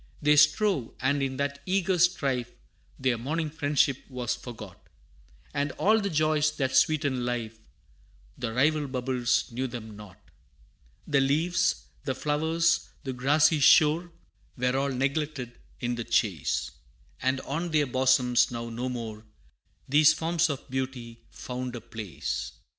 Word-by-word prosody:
They 150 0 +4
strove, 150 - +3
and 140 +2 +1
in 135 -1 -2
that 140 0 -2
eager 190 -1 +1
strife 135 -8 +1 0.5
Their 130 -3 0
morning 155 +5 -2
friendship 145 -3 +1
was 125 -3 -2
forgot, 110 -6 -11 0.7
And 140 0 -1
all 220 +2 +3
the 200 - -1
joys 155 -2 +2
that 130 -2 -1
sweeten 140 -2 +2
life, 115 -2 -3 0.8
The 120 -3 -4
rival 145 +5 +2
bubbles 125 -2 0
knew 130 +3 -2
them 115 -3 -8
not. 105 -3 -13 0.9
The 140 -2 +2
leaves, 165 +5 +1 0.2
the 130 - -2
flowers, 160 +4 +1
the 135 -2 -4
grassy 145 +5 +3
shore, 160 +4 +5 0.5
Were 125 +1 0
all 140 +1 +1
neglected 135 -1 -2 0.2
in 120 -1 -1
the 120 -1 -3
chase, 80 - 0 0.5
And 130 +1 +1
on 165 +5 -3
their 155 -2 +2
bosoms 130 -1 +3
now 115 -1 -5
no 125 +3 -3
more 110 -3 -6 0.6
These 150 +3 +5
forms 165 +1 +1
of 140 -3 -5
beauty 130 -3 -4
found 125 0 -6
a 120 - -6
place. 105 - -5
130 Hz, 135 wpm, -27 LUFS, 120-150 Hz, 0.9 s, shore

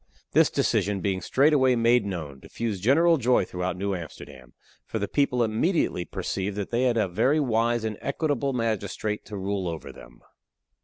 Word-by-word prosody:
This - - +4
decision, 100 0 0
being 95 0 -1
straightway 130 - +3
made 115 -1 +3
known, 80 -8 -5
diffused 105 - -4
general 165 - +4
joy 125 -6 +2
throughout 90 +1 -3
New 100 +1 -1
Amsterdam, 70 -7 -9 0.3
for - - -5
the 100 -1 -2
people 125 -2 +1
immediately 110 - 0
perceived 95 +3 -3
that 100 +1 -4
they 120 +2 +1
had 120 -2 +2
a 110 - +2
very 115 - +2
wise 120 -3 +1
and 110 -2 -4
equitable 140 -1 -1
magistrate 110 -3 -2
to 105 0 -7
rule 95 -1 -2
over 80 -5 -5
them. - - -15
110 Hz, 165 wpm, -26 LUFS, 95-125 Hz, 0.3 s, This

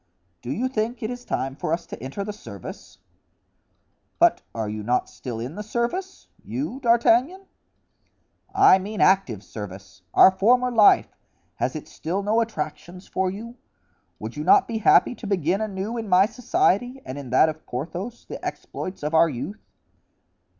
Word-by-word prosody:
"Do 120 - -5
you 245 - 0
think 230 -1 -2
it 220 - -2
is 245 0 -7
time 135 0 -2
for 155 - -3
us 170 +1 -1
to - - -9
enter 135 +10 -5
the 210 +1 -5
service?" 210 - -10 1.2
"But 345 0 +4
are 110 -2 -2
you 105 +1 -4
not 120 +4 0
still 120 -3 -6
in 125 +6 -5
the 210 - -6
service—you, 265 - -4
D'Artagnan?" 250 +9 +3 1.1
"I 190 - +6
mean 205 +3 -6
active 160 - +3
service. 95 -2 -9
Our - - +9
former 245 +7 +3
life, 220 -3 +5 0.4
has - - -1
it - - -6
still 185 +5 -3
no 220 +3 +2
attractions 180 -3 -5
for 190 0 0
you? 230 +6 -8 0.6
would - - -7
you - - -4
not 395 0 +5
be 225 -1 -3
happy 220 - +5
to 240 - -9
begin 190 0 0
anew 210 +2 -3
in 220 -2 -6
my 185 +1 +6
society 250 - 0
and 130 +2 -6
in 135 -3 -8
that 130 +6 +5
of 155 0 -5
Porthos, 180 - -5
the - - -8
exploits 185 -4 -6
of 150 +2 -2
our 165 +1 +5
youth?" 155 - -6
200 Hz, 165 wpm, -24 LUFS, 155-235 Hz, 1.2 s, Our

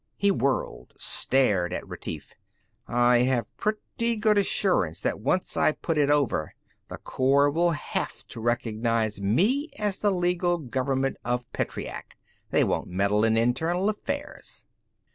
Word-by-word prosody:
He 200 0 +3
whirled, 140 -7 -2
stared 105 -10 +1
at - - -5
Retief. - - -7 0.5
"I 120 0 +4
have 125 -1 0
pretty 230 +2 -2
good 215 -1 +2
assurance 185 - +1
that - - -1
once 180 - 0
I 155 - +3
put 165 - -3
it 145 -1 +3
over, 140 - +1 0.3
the - - -7
Corps 140 +2 +2
will 170 +3 +2
have 155 -3 -3
to 115 - -8
recognize 115 -2 0
me 210 - +2
as 205 -2 -1
the 210 - +2
legal 175 -1 +1
government 135 -1 -1
of 125 0 -1
Petreac. - - -5 0.3
They - - +3
won't - - -1
meddle 100 +3 +1
in 115 0 +3
internal 160 - +1
affairs." 280 +7 -6
135 Hz, 140 wpm, -26 LUFS, 115-185 Hz, 0.5 s, I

